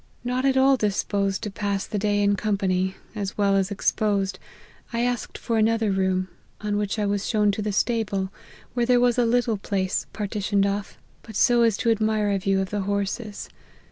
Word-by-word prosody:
Not 250 Hz, +2 st, -1 dB
at 265 Hz, -1 st, +3 dB
all 265 Hz, 0 st, +5 dB
dis 210 Hz, -4 st, 0 dB
posed 200 Hz, -2 st, -1 dB
to 210 Hz, -, -3 dB
pass 200 Hz, -1 st, -2 dB
the 210 Hz, -, -3 dB
day 205 Hz, 0 st, +1 dB
in 200 Hz, 0 st, +3 dB
company, 190 Hz, -2 st, 0 dB, 0.2 s
as 205 Hz, -3 st, -4 dB
well 200 Hz, -1 st, +3 dB
as 195 Hz, 0 st, +1 dB
ex 200 Hz, -, +1 dB
posed, 195 Hz, -3 st, -1 dB, 0.5 s
I 235 Hz, 0 st, -1 dB
asked 245 Hz, -1 st, -2 dB
for 230 Hz, -2 st, -1 dB
another 225 Hz, -1 st, +2 dB
room; 190 Hz, -1 st, +1 dB, 0.3 s
on 210 Hz, -1 st, -2 dB
which 205 Hz, +1 st, -1 dB
I 210 Hz, -, 0 dB
was 200 Hz, 0 st, -1 dB
shown 210 Hz, -2 st, +3 dB
to 200 Hz, -, -3 dB
the 210 Hz, 0 st, -1 dB
stable, 205 Hz, -3 st, 0 dB, 0.4 s
where 240 Hz, -1 st, 0 dB
there 250 Hz, -1 st, +5 dB
was 245 Hz, 0 st, +3 dB
a 240 Hz, -, +4 dB
little 235 Hz, -2 st, +2 dB
place 190 Hz, -1 st, -1 dB
partitioned 205 Hz, -1 st, 0 dB
off, 200 Hz, 0 st, -3 dB, 0.2 s
but 220 Hz, -, -12 dB
so 240 Hz, +2 st, +4 dB
as 225 Hz, -3 st, +3 dB
to 230 Hz, 0 st, +2 dB
admit 215 Hz, -2 st, +1 dB
a 195 Hz, -, +1 dB
view 195 Hz, 0 st, +1 dB
of 190 Hz, -, -4 dB
the 205 Hz, -1 st, -1 dB
horses. 200 Hz, +2 st, -3 dB
205 Hz, 205 wpm, -24 LUFS, 195-225 Hz, 0.5 s, all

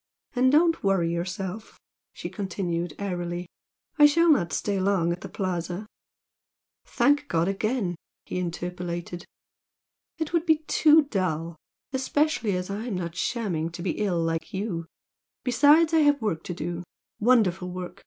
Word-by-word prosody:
"And 255 Hz, +1 st, +4 dB
don't 330 Hz, +2 st, +3 dB
worry 185 Hz, -4 st, +2 dB
yourself" 185 Hz, +4 st, -5 dB, 0.3 s
she -, -, -7 dB
continued, 175 Hz, -5 st, -3 dB
airily 175 Hz, -3 st, -3 dB, 0.5 s
"I 295 Hz, -, +10 dB
shall 335 Hz, +3 st, +4 dB
not 175 Hz, -, +2 dB
stay 200 Hz, -2 st, -1 dB
long 185 Hz, -3 st, +2 dB
at 175 Hz, -, -4 dB
the -, -, -7 dB
Plaza." 180 Hz, +1 st, -3 dB, 1.0 s
"Thank 290 Hz, 0 st, +2 dB
God 165 Hz, -1 st, +1 dB
again!" 200 Hz, 0 st, -1 dB, 0.3 s
he 180 Hz, -, -3 dB
interpolated. 175 Hz, 0 st, -4 dB, 0.9 s
"It 320 Hz, 0 st, -3 dB
would 335 Hz, 0 st, +1 dB
be 315 Hz, -1 st, +3 dB
too 310 Hz, 0 st, +5 dB
dull, 170 Hz, -, -2 dB, 0.4 s
especially 265 Hz, -5 st, +1 dB
as 180 Hz, 0 st, -3 dB
I'm 215 Hz, +1 st, -3 dB
not 170 Hz, -2 st, -4 dB
shamming 180 Hz, -6 st, -1 dB
to 170 Hz, 0 st, -6 dB
be 180 Hz, -, 0 dB
ill, 195 Hz, -5 st, +1 dB
like 165 Hz, -1 st, -2 dB
you. 185 Hz, -5 st, -3 dB, 0.6 s
Besides, 295 Hz, +6 st, +5 dB
I 325 Hz, -, +5 dB
have 290 Hz, -1 st, +4 dB
work 200 Hz, -9 st, -2 dB
to 175 Hz, -, -4 dB
do! 170 Hz, +2 st, -4 dB, 0.4 s
wonderful 205 Hz, -6 st, +3 dB
work! 180 Hz, 0 st, -7 dB
190 Hz, 145 wpm, -26 LUFS, 175-255 Hz, 1.0 s, I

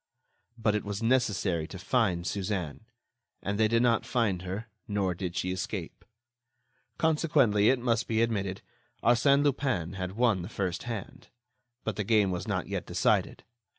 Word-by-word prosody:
But 110 Hz, -2 st, +1 dB
it 105 Hz, -, -1 dB
was 100 Hz, +1 st, -4 dB
necessary 105 Hz, -9 st, +1 dB
to 95 Hz, -, -8 dB
find 95 Hz, -4 st, +1 dB
Suzanne. 95 Hz, -1 st, -3 dB, 0.6 s
And 100 Hz, +1 st, -2 dB
they 110 Hz, -, +5 dB
did 115 Hz, +2 st, +2 dB
not 115 Hz, -2 st, +3 dB
find 110 Hz, -8 st, 0 dB
her, 95 Hz, +5 st, -5 dB, 0.2 s
nor 100 Hz, -3 st, 0 dB
did 90 Hz, 0 st, -5 dB
she 90 Hz, -, -1 dB
escape. 95 Hz, -2 st, -5 dB, 0.9 s
Consequently, 150 Hz, -10 st, +3 dB
it 130 Hz, -, +4 dB
must 120 Hz, -1 st, 0 dB
be 115 Hz, 0 st, +2 dB
admitted, 100 Hz, -5 st, -2 dB, 0.4 s
Arsène 140 Hz, +4 st, +4 dB
Lupin 130 Hz, -, 0 dB
had 95 Hz, -1 st, -4 dB
won 110 Hz, -4 st, +2 dB
the 90 Hz, -, -6 dB
first 95 Hz, -5 st, -2 dB
hand. 115 Hz, -4 st, -6 dB, 0.6 s
But 110 Hz, -, -3 dB
the 105 Hz, -, 0 dB
game 105 Hz, -2 st, +3 dB
was 90 Hz, -, -4 dB
not -, -, -1 dB
yet -, -, -4 dB
decided. -, -, +1 dB
105 Hz, 155 wpm, -29 LUFS, 95-115 Hz, 0.9 s, they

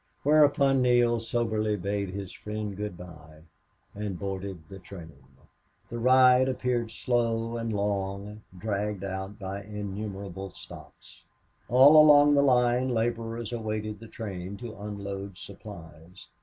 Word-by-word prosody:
Whereupon 140 Hz, -2 st, +4 dB
Neale 120 Hz, -1 st, +3 dB
soberly 110 Hz, -2 st, -1 dB
bade 100 Hz, +1 st, -2 dB
his 95 Hz, 0 st, -6 dB
friend 105 Hz, -1 st, -5 dB
good 105 Hz, -3 st, -5 dB
bye 80 Hz, -3 st, -13 dB, 0.5 s
and 100 Hz, -3 st, -4 dB
boarded 95 Hz, -4 st, -6 dB
the 95 Hz, +2 st, -10 dB
train. 85 Hz, -4 st, -11 dB, 0.8 s
The 120 Hz, -, -5 dB
ride 130 Hz, +1 st, +5 dB
appeared 125 Hz, -3 st, -1 dB
slow 115 Hz, 0 st, -1 dB
and 115 Hz, -1 st, -3 dB
long, 100 Hz, 0 st, -3 dB, 0.2 s
dragged 105 Hz, 0 st, -3 dB
out 95 Hz, +1 st, -5 dB
by 100 Hz, 0 st, -5 dB
innumerable 100 Hz, -2 st, -6 dB
stops. -, -, -14 dB, 0.4 s
All 140 Hz, +5 st, +8 dB
along 145 Hz, -1 st, +7 dB
the 140 Hz, -, +5 dB
line 125 Hz, -1 st, +3 dB
laborers 115 Hz, -1 st, -2 dB
awaited 110 Hz, -2 st, -4 dB
the 115 Hz, -, -11 dB
train 100 Hz, -4 st, -6 dB
to 115 Hz, -1 st, -8 dB
unload 100 Hz, -2 st, -6 dB
supplies. 85 Hz, -4 st, -12 dB
105 Hz, 125 wpm, -27 LUFS, 100-120 Hz, 0.8 s, All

